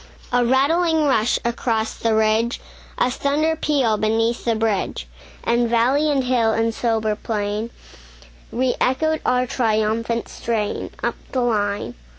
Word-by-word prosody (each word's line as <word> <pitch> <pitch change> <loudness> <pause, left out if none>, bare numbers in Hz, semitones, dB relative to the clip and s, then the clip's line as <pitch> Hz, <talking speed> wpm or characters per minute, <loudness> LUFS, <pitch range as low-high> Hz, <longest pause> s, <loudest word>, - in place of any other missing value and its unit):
A 245 0 +4
rattling 310 +6 +2
rush 240 -5 +2
across 230 -2 -1
the 225 -1 0
ridge, 220 +2 +2 0.4
A 250 - +2
thunder 295 +4 0
peal 275 -9 +1
beneath 225 +2 0
the 230 -1 +2
bridge; 220 -3 -1 0.4
And 235 0 +1
valley 255 +6 +2
and 275 -3 +1
hill 240 -3 +2
and 225 0 0
sober 220 -2 0
plain 210 +1 -3 0.8
Re 255 +1 +1
echoed 315 +5 +1
our 250 0 +2
triumphant 230 -1 0
strain, 220 -3 -3
Up - - +1 0.2
the 255 - +1
line. 205 - -1
235 Hz, 135 wpm, -21 LUFS, 220-260 Hz, 0.8 s, A